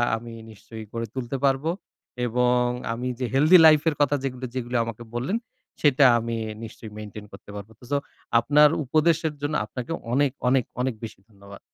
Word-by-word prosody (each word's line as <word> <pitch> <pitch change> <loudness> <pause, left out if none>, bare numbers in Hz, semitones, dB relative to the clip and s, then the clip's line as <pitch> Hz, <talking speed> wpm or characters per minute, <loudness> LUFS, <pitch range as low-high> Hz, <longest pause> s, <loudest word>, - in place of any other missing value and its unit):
আমি 115 +1 -8 0.2
নিশ্চয়ই 110 +1 -11
গড়ে 115 0 -3
তুলতে 130 +1 -3
পারব। 135 0 +2 0.6
এবং 125 +1 +2 0.3
আমি 125 +2 -4
যে 125 - -1
healthy 155 +7 +7
life 155 -2 +7
এর 150 - -4
কথা 145 0 +3
যেগুলি, 130 -1 -4
যেগুলি 125 -1 -4
আমাকে 115 0 -7
বললেন, 135 - -1 0.4
সেটা 145 -2 +5
আমি 115 0 -3 0.3
নিশ্চয়ই 110 -1 -10
maintain 105 0 -8
করতে 100 - -13
পারব। 100 +1 -8
তো - - -20
সো, 145 - +3 0.4
আপনার 145 +5 +5 0.2
উপদেশের 155 +2 +2
জন্য 145 +1 -2
আপনাকে 125 +3 -7 0.2
অনেক, 140 0 +3 0.2
অনেক, 130 -1 +3 0.2
অনেক 130 -1 0
বেশি 110 -3 -8
ধন্যবাদ। 100 -1 -14
125 Hz, 170 wpm, -24 LUFS, 115-145 Hz, 0.6 s, healthy